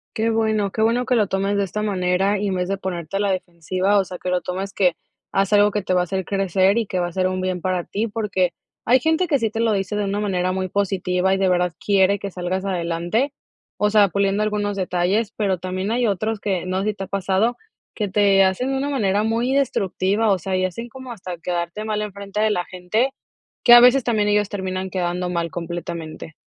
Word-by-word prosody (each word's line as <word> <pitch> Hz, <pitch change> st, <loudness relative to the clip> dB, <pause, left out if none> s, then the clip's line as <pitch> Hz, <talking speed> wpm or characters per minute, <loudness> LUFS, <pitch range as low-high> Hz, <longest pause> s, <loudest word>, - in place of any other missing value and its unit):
Qué 225 Hz, +1 st, +1 dB
bueno. 220 Hz, -3 st, +1 dB
Qué 220 Hz, -, 0 dB
bueno 240 Hz, +2 st, +2 dB
que 255 Hz, -, +2 dB
lo 215 Hz, -3 st, +3 dB
tomes 195 Hz, +2 st, 0 dB
de 200 Hz, -, +2 dB
esta 210 Hz, +2 st, -3 dB
manera, 195 Hz, 0 st, +1 dB
y 205 Hz, -, -1 dB
en 195 Hz, -, -1 dB
vez 180 Hz, 0 st, -2 dB
de 195 Hz, -, -1 dB
ponerte 185 Hz, -1 st, -4 dB
a -, -, -1 dB
la 200 Hz, -1 st, +1 dB
defensiva, 185 Hz, +2 st, -1 dB
o 195 Hz, -, +2 dB
sea, 180 Hz, -, -8 dB
que 180 Hz, -, -4 dB
lo 180 Hz, 0 st, +1 dB
tomes 190 Hz, +2 st, -4 dB
que 180 Hz, -4 st, +2 dB, 0.4 s
haz 195 Hz, +1 st, +1 dB
algo 205 Hz, 0 st, +5 dB
que 205 Hz, 0 st, -1 dB
te 185 Hz, -1 st, -1 dB
va 180 Hz, -, +4 dB
a -, -, +1 dB
hacer 190 Hz, +1 st, -2 dB
crecer 195 Hz, +1 st, +2 dB
y 230 Hz, -, +1 dB
que 185 Hz, -2 st, -3 dB
va 175 Hz, -, 0 dB
a 175 Hz, -, -7 dB
ser 185 Hz, +1 st, +1 dB
un 185 Hz, 0 st, -2 dB
bien 185 Hz, -1 st, -2 dB
para 185 Hz, -1 st, -1 dB
ti. 215 Hz, +6 st, -2 dB
Porque 205 Hz, -5 st, 0 dB, 0.3 s
hay 255 Hz, +2 st, +5 dB
gente 320 Hz, +5 st, +1 dB
que 285 Hz, -4 st, +2 dB
sí 225 Hz, -2 st, 0 dB
te 225 Hz, -, -5 dB
lo 225 Hz, -2 st, +2 dB
dice 195 Hz, +1 st, -2 dB
de 210 Hz, -, 0 dB
una 200 Hz, +1 st, -1 dB
manera 185 Hz, -3 st, 0 dB
muy 185 Hz, 0 st, -2 dB
positiva, 190 Hz, -1 st, 0 dB
y 195 Hz, -, +1 dB
de 190 Hz, -1 st, +2 dB
verdad 180 Hz, -1 st, +1 dB
quiere 200 Hz, 0 st, +3 dB
que 200 Hz, -, -5 dB
salgas 180 Hz, +1 st, -3 dB
adelante, 180 Hz, +8 st, -1 dB, 0.4 s
o 210 Hz, +1 st, +2 dB
sea, 210 Hz, -2 st, +5 dB
puliendo 200 Hz, +2 st, +1 dB
algunos 205 Hz, -1 st, -1 dB
detalles, 190 Hz, +4 st, 0 dB
pero 195 Hz, -3 st, 0 dB
también 185 Hz, +2 st, -3 dB
hay 240 Hz, +1 st, +1 dB
otros 215 Hz, +2 st, -1 dB
que, 185 Hz, -3 st, -2 dB
no 185 Hz, +1 st, -1 dB
sé 210 Hz, -, 0 dB
si 215 Hz, -, -1 dB
te 195 Hz, -1 st, -6 dB
ha -, -, -16 dB
pasado, 195 Hz, +5 st, 0 dB, 0.4 s
que 210 Hz, -, -1 dB
te 195 Hz, 0 st, +4 dB
hacen 190 Hz, +8 st, 0 dB
una 270 Hz, +1 st, -1 dB
manera 210 Hz, -6 st, +1 dB
muy 230 Hz, +3 st, 0 dB
destructiva. 205 Hz, -4 st, +1 dB
O 190 Hz, -, +3 dB
sea, 185 Hz, +2 st, -3 dB
y 185 Hz, -, +1 dB
hacen 230 Hz, +6 st, -5 dB
como 260 Hz, 0 st, -9 dB
hasta 185 Hz, -5 st, -7 dB
quedarte 175 Hz, +4 st, -3 dB
mal 210 Hz, -1 st, -1 dB
en 210 Hz, -2 st, -6 dB
frente 200 Hz, +1 st, -6 dB
de 215 Hz, 0 st, +3 dB
la 180 Hz, -3 st, -1 dB
gente, 185 Hz, +8 st, -1 dB, 0.5 s
que 240 Hz, -, +8 dB
a 240 Hz, -, +11 dB
veces 250 Hz, +2 st, +6 dB
también 215 Hz, -3 st, +1 dB
ellos 205 Hz, -1 st, +2 dB
terminan 190 Hz, -1 st, -3 dB
quedando 180 Hz, -1 st, -2 dB
mal 170 Hz, -2 st, -2 dB
completamente. 170 Hz, -2 st, -6 dB
195 Hz, 240 wpm, -22 LUFS, 185-210 Hz, 0.5 s, a